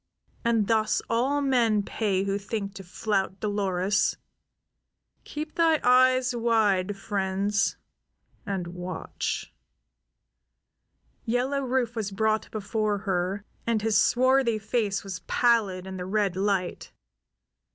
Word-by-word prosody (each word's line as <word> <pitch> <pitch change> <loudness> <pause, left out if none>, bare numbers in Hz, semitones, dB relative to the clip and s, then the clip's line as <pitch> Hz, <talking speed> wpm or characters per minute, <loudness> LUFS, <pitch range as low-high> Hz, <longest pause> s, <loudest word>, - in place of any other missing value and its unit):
And 230 -3 +2
thus 215 +1 +1
all 265 +5 +1
men 235 -6 +2
pay 195 -3 -1
who 200 0 -1
think 200 0 -4
to 195 - -9
flout 195 +1 -2
Dolores. 205 -1 0 1.1
Keep 305 +1 -6
thy 325 -2 +3
eyes 255 0 +4
wide, 210 -5 +2
friends, 200 0 0 0.7
and 195 -3 -3
watch." 180 -1 -4 1.7
Yellow 255 +4 0
Rufe 250 -2 -1
was 215 -3 -2
brought 215 +2 0
before 215 0 -1
her, 190 +1 -1 0.2
and 225 -2 +1
his 220 -1 +1
swarthy 255 -2 +3
face 210 -1 -1
was 190 -2 -6
pallid 210 -7 +2
in 190 0 -6
the 180 - -5
red 200 -2 0
light. 190 -2 -1
210 Hz, 110 wpm, -27 LUFS, 195-235 Hz, 1.7 s, eyes